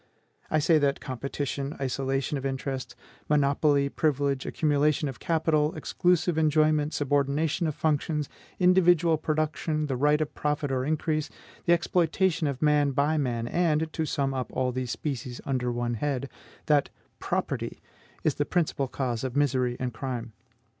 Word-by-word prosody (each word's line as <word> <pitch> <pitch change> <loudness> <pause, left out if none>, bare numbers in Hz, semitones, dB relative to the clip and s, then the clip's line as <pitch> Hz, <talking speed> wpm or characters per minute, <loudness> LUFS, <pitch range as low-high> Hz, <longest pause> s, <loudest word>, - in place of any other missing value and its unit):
I 155 - +2
say 155 +1 +4
that 140 -1 +1
competition, 140 +2 -4
isolation 135 +1 -1
of 135 - -4
interests, 135 0 -3 0.3
monopoly, 145 0 +3
privilege, 140 -2 0
accumulation 150 0 +1
of 135 - -6
capital, 160 -2 +1
exclusive 175 -2 +1
enjoyment, 155 -1 +3
subordination 145 +4 +1
of 155 - -2
functions, 150 -1 0 0.3
individual 175 -3 +4
production, 155 0 -1
the 135 -3 -2
right 150 +3 +3
of 155 -1 -2
profit 150 -1 -1
or 130 -1 0
increase, 155 0 -1 0.4
the 170 - +5
exploitation 175 -1 +1
of 140 +1 -3
man 145 -2 +3
by 150 +3 +2
man, 120 -4 -1
and, 160 0 +1
to 160 -1 -1
sum 135 -2 0
up 130 -1 -3
all 130 -1 0
these 125 0 -3
species 125 -2 -4
under 125 -3 -1
one 120 0 -1
head, 140 +2 -2 0.3
that 145 -2 +3 0.3
PROPERTY - - -2 0.4
is 155 - +2
the 145 - 0
principal 155 -6 0
cause 125 -3 -3
of 130 -1 -3
misery 130 -4 +1
and 125 -1 -2
crime. 120 -1 -5
145 Hz, 145 wpm, -27 LUFS, 135-155 Hz, 0.4 s, the